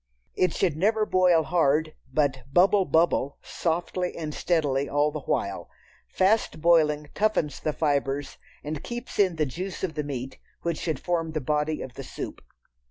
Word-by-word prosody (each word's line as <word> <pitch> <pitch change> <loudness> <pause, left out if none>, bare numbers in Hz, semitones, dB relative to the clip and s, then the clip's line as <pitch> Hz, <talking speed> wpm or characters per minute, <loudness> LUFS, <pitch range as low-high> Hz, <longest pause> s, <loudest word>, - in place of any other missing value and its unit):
It 180 -2 +2
should 175 -6 +1
never 215 +6 +2
boil 180 -4 +4
hard, 155 -1 +2 0.2
but 135 -2 +1
"bubble 190 +4 +5
bubble" 155 -3 +2
softly 175 +2 -2
and 155 -2 -4
steadily 145 -6 0
all 145 +1 +2
the 150 - -4
while. 100 -7 -2 0.4
Fast 195 -1 +1
boiling 150 -3 +3
toughens 210 -8 0
the 155 - 0
fibres 145 -2 -1 0.2
and 150 0 -4
keeps 240 -2 -6
in 185 -4 +4
the 155 -1 +1
juice 180 +9 -5
of 180 -4 -1
the 150 -1 -2
meat 135 -2 -5 0.2
which 170 -2 -1
should 155 -6 -2
form 165 -2 -1
the 155 - 0
body 150 +2 -1
of 130 - -9
the 135 - -7
soup. - - -7
155 Hz, 165 wpm, -26 LUFS, 145-180 Hz, 0.4 s, bubble